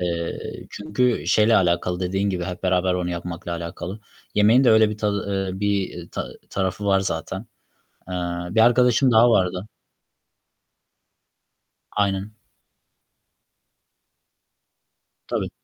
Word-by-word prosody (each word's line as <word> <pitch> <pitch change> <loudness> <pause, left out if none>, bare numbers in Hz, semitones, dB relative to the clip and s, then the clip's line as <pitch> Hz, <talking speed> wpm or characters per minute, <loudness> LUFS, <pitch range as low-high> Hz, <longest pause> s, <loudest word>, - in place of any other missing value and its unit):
Eee, 85 -1 -2 0.3
çünkü 110 +4 -1
şeyle 110 +1 +4
alakalı, 90 0 +1
dediğin 95 +2 0
gibi 90 -2 -2
hep 90 +1 -6
beraber 90 0 +2
onu 90 -1 -2
yapmakla 85 0 -5
alakalı. 85 +4 -6 0.3
Yemeğin 110 +6 +5
de - - +6
öyle 110 -1 +5
bir 105 - -6
tadı, 100 -2 -1
eee, 95 - -7
bir 100 -4 -2
ta - - -4 0.2
tarafı 95 +1 -2
var 95 -1 +4
zaten. 95 +1 -3 0.7
Eee, 90 - -4 0.4
bir 110 - +2
arkadaşım 125 +2 +4
daha 115 +2 +6
vardı. 95 0 +1 2.2
Aynen. 100 +1 -1 2.9
Tabii. - - -2
95 Hz, 110 wpm, -23 LUFS, 90-105 Hz, 2.9 s, de